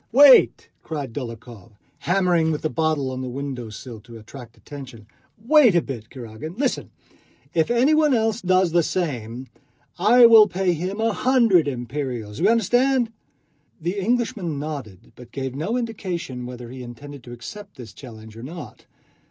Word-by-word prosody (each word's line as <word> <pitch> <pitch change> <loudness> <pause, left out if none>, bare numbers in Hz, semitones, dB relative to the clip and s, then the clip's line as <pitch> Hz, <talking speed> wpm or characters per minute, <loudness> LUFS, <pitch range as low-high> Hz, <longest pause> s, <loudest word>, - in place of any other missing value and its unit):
"Wait!" 275 +2 +6
cried 145 -7 -6
Dólokhov, 115 -3 -8 0.3
hammering 175 -3 +2
with 150 - -3
the 155 - -1
bottle 155 -5 0
on 130 0 -5
the 130 - -4
window 130 -3 -5
sill 110 +1 -9
to 115 0 -12
attract 115 +1 -12
attention. 130 -7 -11 0.4
"Wait 265 - +6
a 170 - +4
bit, 120 -5 -7
Kurágin. 130 - -9
Listen! 270 -1 -1 0.6
If 160 -1 +1
anyone 295 +6 +3
else 225 0 0
does 185 -1 +2
the 170 +1 +4
same, 130 -9 -3 0.5
I 235 +6 +6
will 225 -2 +8
pay 185 -1 0
him 185 +6 -4
a 225 0 +1
hundred 230 - +3
imperials. 125 -4 -4
Do - - 0
you - - +5
understand?" 245 +2 +2 0.7
The 175 +5 -3
Englishman 200 -7 -1
nodded, 135 - -7
but 125 -1 -14
gave 130 -1 -4
no 160 - -2
indication 180 - -4
whether 125 -1 -9
he 130 0 -8
intended 135 +3 -10
to 120 - -10
accept 200 - -10
this 120 -3 -10
challenge 110 -4 -12
or 115 - -10
not. 155 +5 -10
155 Hz, 160 wpm, -23 LUFS, 125-205 Hz, 0.7 s, will